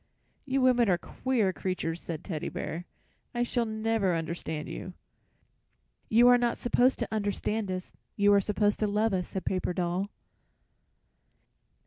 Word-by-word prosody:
"You 270 -1 +1
women 245 -3 +4
are 180 - +4
queer 225 -2 0
creatures," 175 -3 -3
said 165 -1 -5
Teddy 160 -6 -4
Bear. 170 +2 -5 0.5
"I 240 - +2
shall 240 0 0
never 220 -4 0
understand 165 -2 -4
you." - - -6 1.2
"You 235 +2 +6
are 245 0 +7
not 240 -1 +1
supposed 245 +2 +3
to 235 - -2
understand 210 0 -1
us. 185 0 -4 0.2
You 205 0 +4
are 200 - +5
supposed 205 +1 +1
to 215 - +1
love 210 +1 +1
us," 180 -2 -1
said 190 - -5
Paper 185 -1 -1
Doll. 180 +2 -1
205 Hz, 145 wpm, -29 LUFS, 180-230 Hz, 1.2 s, are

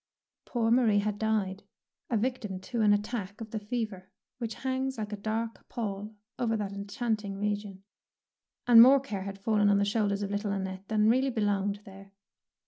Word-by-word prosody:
Poor 230 -2 0
Marie 235 -4 +4
had 205 0 0
died, 210 -3 0 0.5
a 235 - +2
victim 215 -5 -2
to 230 +5 -3
an 210 -1 +5
attack 205 -1 -1
of 225 -1 -8
the 220 - -2
fever 210 -3 -4 0.3
which 230 -2 -4
hangs 265 0 -2
like 210 -1 -4
a - - 0
dark 220 +2 -4
pall 210 -1 -4 0.2
over 225 -2 +1
that 200 -2 -3
enchanting 200 0 -3
region, 205 -1 -3 0.8
and 235 -2 +9
more 265 +3 +8
care 210 -8 -5
had 195 0 -5
fallen 205 0 +2
on 200 - +4
the 200 - +2
shoulders 205 -1 0
of 200 - -3
little 205 0 -1
Annette 190 0 -4
than 215 -1 +2
really 260 +4 +3
belonged 205 -3 0
there. 195 0 -13
210 Hz, 175 wpm, -29 LUFS, 200-230 Hz, 0.8 s, and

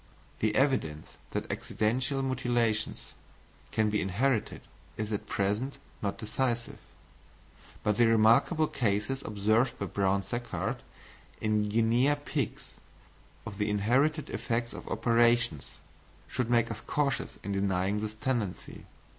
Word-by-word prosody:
The 105 -1 +1
evidence 130 - 0
that - - -3
accidental 125 +5 0
mutilations 120 -4 0 0.6
can 110 -1 +2
be 105 - +1
inherited 110 +5 0 0.4
is 110 0 -2
at 105 - -3
present 105 +8 -1 0.2
not 100 -1 -2
decisive; 120 +1 -2 1.0
but 105 0 +1
the 120 - +5
remarkable 115 +9 +4
cases 110 0 -1
observed 110 +4 +1
by 100 - -3
Brown 100 +1 +1
Sequard 120 +4 -3 0.6
in 105 -1 +1
guinea 115 +6 +3
pigs, 145 - -3 0.8
of 105 -1 -7
the 105 0 +1
inherited 130 +10 +2
effects 120 -1 -2
of - - -9
operations, 115 - +2 0.5
should 125 -2 -2
make 120 -1 +3
us - - -5
cautious 140 -3 -1
in 100 - -3
denying 100 +1 +1
this 110 0 -4
tendency. 110 -5 -3
115 Hz, 120 wpm, -30 LUFS, 105-125 Hz, 1.0 s, the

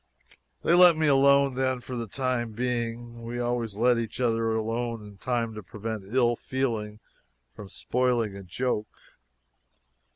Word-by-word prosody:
They - - +3
let 175 -2 +7
me 160 - +1
alone 140 -1 +5
then 130 0 0
for 125 +1 -7
the 115 -1 -4
time 120 -1 -2
being. 120 0 -3
We 120 +1 -5
always 120 -3 -2
let 120 +2 +3
each 115 0 -5
other 115 -2 +1
alone 115 0 -2
in 100 -1 -13
time 120 -3 -1
to 105 - -7
prevent 105 0 -6
ill 120 -2 +4
feeling 115 -5 -3 0.5
from 100 -2 -10
spoiling 120 -4 0
a 100 - -8
joke. 105 +3 -2
120 Hz, 150 wpm, -27 LUFS, 110-125 Hz, 0.5 s, let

